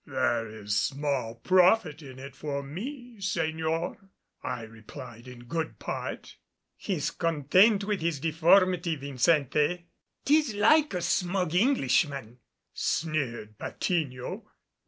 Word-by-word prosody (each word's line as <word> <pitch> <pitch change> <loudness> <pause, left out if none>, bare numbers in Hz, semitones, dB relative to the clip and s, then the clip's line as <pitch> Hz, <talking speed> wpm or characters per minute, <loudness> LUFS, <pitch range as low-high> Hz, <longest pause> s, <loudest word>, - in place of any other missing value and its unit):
"There 130 -5 0
is 105 -1 -4
small 135 -4 -1
profit 180 - +3
in 130 -3 -11
it 135 0 -9
for 140 -1 -4
me, 240 - -7
Señor," 165 +1 -2 0.3
I 120 - -4
replied 115 +2 -11
in 125 -1 -11
good 160 +6 -3
part. - - -6 0.4
"He's 165 -5 -2
content 175 +7 +3
with 205 -2 -1
his 165 -3 -1
deformity, 170 +2 +3
Vincente." 150 +4 +1 0.4
"'Tis 295 -6 +3
like 295 +3 +4
a 175 - -2
smug 180 -1 0
Englishman," 140 - +1 0.3
sneered 130 -9 -2
Patiño. 140 -8 -3
160 Hz, 110 wpm, -28 LUFS, 130-185 Hz, 0.4 s, like